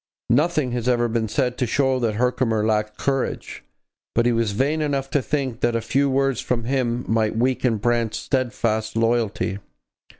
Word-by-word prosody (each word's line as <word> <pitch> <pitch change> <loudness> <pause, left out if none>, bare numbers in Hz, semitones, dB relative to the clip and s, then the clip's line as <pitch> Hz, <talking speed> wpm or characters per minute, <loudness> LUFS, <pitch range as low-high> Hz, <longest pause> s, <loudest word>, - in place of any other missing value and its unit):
Nothing 150 0 +2
has 120 0 -2
ever 120 -1 +2
been 115 -1 -1
said 125 +2 -1
to 125 - +1
show 130 0 +1
that 115 -3 0
Herkimer 115 -2 +1
lacked 105 -1 0
courage. 135 -2 -2 0.5
But 120 - +3
he 120 - +4
was 115 -3 +1
vain 145 +8 +1
enough 140 -3 -1
to 145 - +2
think 130 -4 -2
that 120 -1 +1
a - - +2
few 135 +5 +1
words 135 -2 +1
from 120 -2 -1
him 125 -1 -1
might 110 -1 +1
weaken 125 -1 +1
Brant's 115 0 0
steadfast 115 -4 -1
loyalty. 115 -4 0
120 Hz, 170 wpm, -23 LUFS, 115-130 Hz, 0.5 s, he